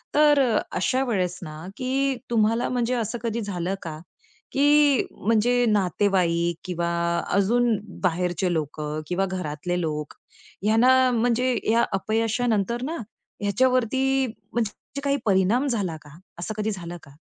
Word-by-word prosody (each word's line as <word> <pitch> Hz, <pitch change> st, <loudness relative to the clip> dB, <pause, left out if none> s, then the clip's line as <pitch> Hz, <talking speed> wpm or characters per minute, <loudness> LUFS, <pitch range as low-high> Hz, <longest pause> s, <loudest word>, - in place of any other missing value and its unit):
तर 295 Hz, -1 st, +5 dB
अ, 240 Hz, -5 st, +3 dB, 0.2 s
अशा 255 Hz, +8 st, +1 dB
वेळेस 180 Hz, -6 st, 0 dB
ना 155 Hz, +1 st, -8 dB
की 270 Hz, +1 st, 0 dB
तुम्हाला 230 Hz, +1 st, +2 dB
म्हणजे 245 Hz, 0 st, 0 dB
असं 235 Hz, 0 st, -2 dB
कधी 230 Hz, 0 st, -1 dB
झालं 190 Hz, -2 st, -2 dB
का 155 Hz, -2 st, -6 dB, 0.5 s
की 290 Hz, -1 st, +4 dB
म्हणजे 235 Hz, +3 st, +2 dB
नातेवाईक 180 Hz, -5 st, +1 dB
किंवा 175 Hz, -2 st, -2 dB, 0.4 s
अजून 225 Hz, +4 st, +3 dB, 0.3 s
बाहेरचे 180 Hz, 0 st, 0 dB
लोकं 150 Hz, -1 st, -3 dB
किंवा 185 Hz, +2 st, 0 dB
घरातले 180 Hz, -1 st, -3 dB
लोक, 150 Hz, -2 st, -3 dB, 0.5 s
ह्यांना 255 Hz, +4 st, +5 dB
म्हणजे 245 Hz, +1 st, +1 dB, 0.2 s
या 235 Hz, +1 st, +4 dB
अपयशानंतर 225 Hz, +2 st, 0 dB
ना 320 Hz, +5 st, -3 dB, 0.4 s
ह्याच्यावरती 260 Hz, +4 st, +2 dB, 0.3 s
म्हणजे 235 Hz, +4 st, -4 dB
काही 280 Hz, 0 st, +1 dB
परिणाम 205 Hz, +7 st, +3 dB
झाला 195 Hz, -10 st, -1 dB
का? 150 Hz, +1 st, -15 dB, 0.2 s
असं 180 Hz, +5 st, -4 dB
कधी 215 Hz, +1 st, -1 dB
झालं 175 Hz, -3 st, -6 dB
का? 140 Hz, -, -15 dB
215 Hz, 130 wpm, -24 LUFS, 180-245 Hz, 0.5 s, तर